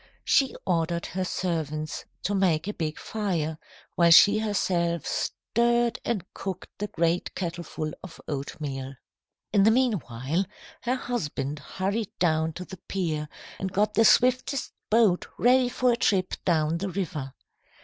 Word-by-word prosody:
She 270 -2 +3
ordered 170 -1 0
her 185 +2 -3
servants 155 -4 -3 0.2
to 205 - 0
make 180 -4 +2
a 210 - -2
big 160 -4 -3
fire, 170 -8 -2 0.3
while 170 -1 +4
she 205 +5 +8
herself 175 -6 0
stirred 235 0 0
and 205 -7 -1
cooked 190 -2 -5
the 210 - -2
great 170 -1 0
kettleful 170 -3 -4
of 185 - -10
oatmeal. 135 -2 -4 0.6
"In 205 - +5
the 205 - +6
meanwhile, 175 - +1 0.4
her 250 +1 0
husband 150 - -3
hurried 195 +7 -2
down 160 -2 +1
to 180 +3 -7
the 190 - -9
pier, 155 -6 -2 0.3
and 190 -1 -3
got 210 +2 +1
his 225 - +7
swiftest 255 +2 +2 0.2
boat 215 -5 +3
ready 250 +1 +4
for 250 0 +2
a 235 - +1
trip 190 -5 +1
down 160 -1 +2
the 195 +2 -2
river. 160 -8 -4
180 Hz, 140 wpm, -27 LUFS, 160-210 Hz, 0.6 s, she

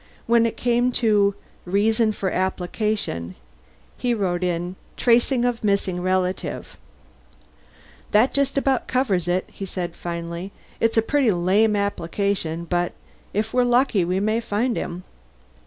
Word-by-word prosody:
When 230 0 +4
it - - -5
came 245 +1 +2
to 205 -4 +3 0.3
REASON 215 +4 +2
FOR 190 -3 -2
APPLICATION, 185 - -2 0.6
he 245 -1 0
wrote 185 -4 -1
in, 175 0 -2 0.2
Tracing 240 +1 +3
of 245 -2 -1
missing 200 -3 0
relative. 185 0 -2 1.3
"That 220 +5 +3
just 280 0 +1
about 270 -2 +1
covers 210 -10 +1
it," 180 +1 0
he - - -8
said 180 -3 -4
finally. 170 +2 -5 0.3
"It's 225 0 +1
a 225 - +5
pretty 275 0 +2
lame 200 +4 +3
application, 195 -3 -1
but 175 0 -1 0.4
if 215 +2 -2
we're 250 - +4
lucky 245 -5 +3
we 180 +2 0
may 215 +3 +1
find 230 +2 -1
him." 180 +1 -4
200 Hz, 135 wpm, -23 LUFS, 180-230 Hz, 1.3 s, a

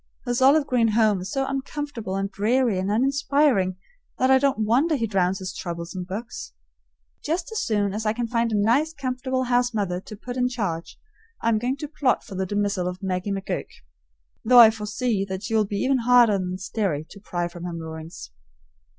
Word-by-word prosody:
His 245 0 -1
olive 280 +3 +5
green 245 -4 +2
home 215 -4 +3
is 185 - -6
so 270 0 0
uncomfortable 270 -6 -4
and 195 +1 -2
dreary 225 0 +1
and 190 +1 -2
uninspiring 265 -4 +2 0.4
that 260 +1 +3
I 265 - +6
don't 265 -6 +1
wonder 275 +9 +3
he 230 -5 0
drowns 190 -3 +1
his 185 0 -6
troubles 170 0 -6
in 180 -1 -4
books. 185 - -7 0.7
Just 335 +6 -2
as 445 - -2
soon 205 -3 0
as 215 +1 -3
I 215 - +2
can 240 +2 -2
find 230 0 0
a 215 - +1
nice 255 +10 +2
comfortable 260 -1 -2
house 245 -1 +1
mother 185 -4 -1
to 215 - -10
put 245 +4 -7
in 250 0 +2
charge, 190 -10 -4 0.5
I 230 - +3
am 220 -2 +2
going 250 +4 -1
to 300 - -5
plot 285 -4 0
for 200 - -11
the 190 0 -2
dismissal 205 -2 -1
of 180 +1 -6
Maggie 185 +1 -2
McGurk, 195 -1 -3 0.8
though 250 +2 +5
I 230 -2 +10
foresee 215 0 -2
that 190 0 -5
she 225 - -4
will 215 -1 +3
be 200 0 -4
even 265 0 +2
harder 235 -4 +5
than 180 0 -3
Sterry 185 -5 -2
to 200 - -11
pry 175 -3 -3
from 175 0 -9
her 175 - -4
moorings. 160 - -8
215 Hz, 200 wpm, -24 LUFS, 190-255 Hz, 0.8 s, I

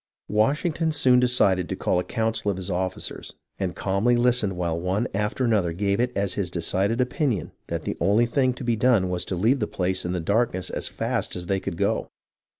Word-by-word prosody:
Washington 150 - +1
soon 130 -4 +4
decided 100 -8 +3
to - - -2
call 90 - 0
a - - -1
council 110 0 -1
of 100 - -1
his 95 +1 -4
officers, 95 +1 -4 0.2
and 95 -4 -2
calmly 100 +6 +1
listened 120 -6 +2
while 85 -2 -1
one 95 +7 0
after 105 +5 -1
another 100 -8 +1
gave 100 +3 0
it 125 +1 +1
as 100 -1 0
his 95 -4 -2
decided 95 +6 0
opinion 125 - 0 0.2
that - - -3
the - - -3
only 100 +7 +4
thing 130 +1 +1
to 130 - -7
be 120 -1 +1
done 110 -5 +3
was 90 -1 -1
to 95 - -3
leave 115 +10 +2
the 105 - -1
place 95 0 -1
in 90 - -2
the 90 - -1
darkness 100 +1 0
as - - -3
fast - - -2
as 90 -1 -4
they 95 +2 0
could 95 -3 -5
go. - - 0
100 Hz, 210 wpm, -25 LUFS, 90-120 Hz, 0.2 s, soon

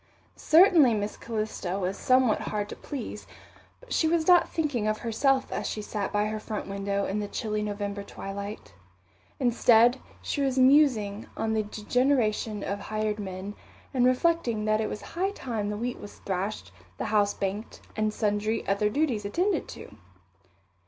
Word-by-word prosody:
Certainly 320 - +6
Miss 205 0 -3
Calista 215 -5 -3
was 190 0 -2
somewhat 255 -2 +3
hard 210 -1 -3
to - - -6
please, 250 -7 -7 0.5
but - - -8
she 320 - +2
was 325 -1 +1
not 355 -1 +6
thinking 285 -9 -1
of 215 0 +1
herself 260 +4 +1
as - - -2
she 210 - -4
sat 205 -1 -3
by 210 0 +1
her 215 0 -3
front 215 -1 -5
window 200 0 -2
in 200 +2 -2
the 205 - -3
chilly 215 0 -3
November 205 -1 -3
twilight. 200 - -7 0.7
Instead, 240 0 +4 0.2
she 285 - -2
was 265 -2 0
musing 255 -7 +4
on 220 0 -1
the 220 - +2
degeneration 215 0 0
of 200 +1 -3
hired 215 0 -2
men, 190 0 -5 0.4
and 250 -2 +4
reflecting 255 -5 +1
that 215 0 +2
it 215 - -1
was - - -5
high 370 +3 -2
time 230 - -4
the 210 - -3
wheat 245 +3 -3
was 205 - -10
thrashed, 195 - -3 0.3
the - - -3
house 205 -1 +2
banked, 200 +3 -4 0.2
and 215 0 0
sundry 210 +1 -1
other 200 +2 +2
duties 250 -4 0
attended 350 - 0
to. - - -10
215 Hz, 165 wpm, -27 LUFS, 205-255 Hz, 0.7 s, Certainly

